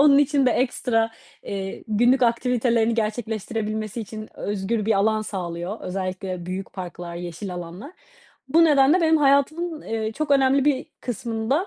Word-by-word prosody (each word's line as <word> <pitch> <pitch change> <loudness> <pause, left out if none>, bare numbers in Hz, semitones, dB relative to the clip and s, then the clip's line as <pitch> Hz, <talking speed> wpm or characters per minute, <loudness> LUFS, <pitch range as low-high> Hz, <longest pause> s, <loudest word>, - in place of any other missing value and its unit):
onun 285 -1 +7
için 285 -1 +3
de - - +5
ekstra, 230 -3 +1 0.3
eee, 195 -1 -5
günlük 240 +5 +3
aktivitelerini 235 -1 +2
gerçekleştirebilmesi 220 0 -2
için 215 0 -7
özgür 205 +2 -2
bir 225 - +4
alan 215 +2 +2
sağlıyor. 180 0 -4
Özellikle 185 -1 -4
büyük 185 +1 -5
parklar, 175 -2 -7
yeşil 175 +2 -6
alanlar. 180 - -8 0.6
Bu 330 +5 +5
nedenle 295 +2 +5
benim 320 -1 +4
hayatımın, 305 +3 +2
eee, 220 -1 -3
çok 305 +5 -3
önemli 270 -1 +4
bir 285 -3 +1
kısmında 235 - -1
225 Hz, 140 wpm, -24 LUFS, 195-270 Hz, 0.6 s, onun